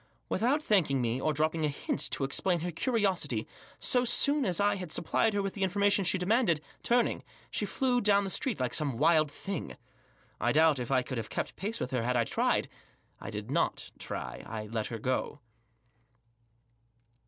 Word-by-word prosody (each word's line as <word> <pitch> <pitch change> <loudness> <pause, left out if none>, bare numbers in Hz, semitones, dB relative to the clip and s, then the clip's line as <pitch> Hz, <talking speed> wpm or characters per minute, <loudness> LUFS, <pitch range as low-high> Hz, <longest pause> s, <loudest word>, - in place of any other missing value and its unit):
Without 275 +7 +1
thanking 165 - +2
me, 120 +1 -1
or 155 - +1
dropping 155 +2 0
a - - +3
hint 145 0 -2
to - - -2
explain 170 +6 0
her 175 +1 -3
curiosity, 180 - 0 0.3
so 250 -1 +3
soon 275 +4 +2
as 180 -2 0
I 205 0 +3
had 180 -4 -6
supplied 210 +7 +1
her 200 - +1
with 195 - -3
the 200 - -7
information 200 +2 +2
she 185 +1 +3
demanded, 185 -2 +2 0.2
turning, 240 0 +1 0.3
she - - -1
flew 255 -2 +1
off - - -4
down 200 -1 +4
the 195 - -3
street 240 - -1
like 125 -1 -1
some 145 -6 0
wild 155 +1 +4
thing. 190 +4 -6 0.6
I - - +1
doubt 155 -2 +4
if 120 - -4
I 130 -2 +2
could 125 -1 -4
have 110 - -6
kept - - -3
pace 215 +4 -4
with 125 - -3
her 125 -2 0
had 125 +2 0
I 120 - +3
tried. - - 0 0.5
I - - -7
did - - -6
not - - -1
try. - - -6
I 110 -1 -5
let 110 0 -3
her 115 - -5
go. 130 +5 -2
170 Hz, 190 wpm, -30 LUFS, 135-205 Hz, 0.6 s, down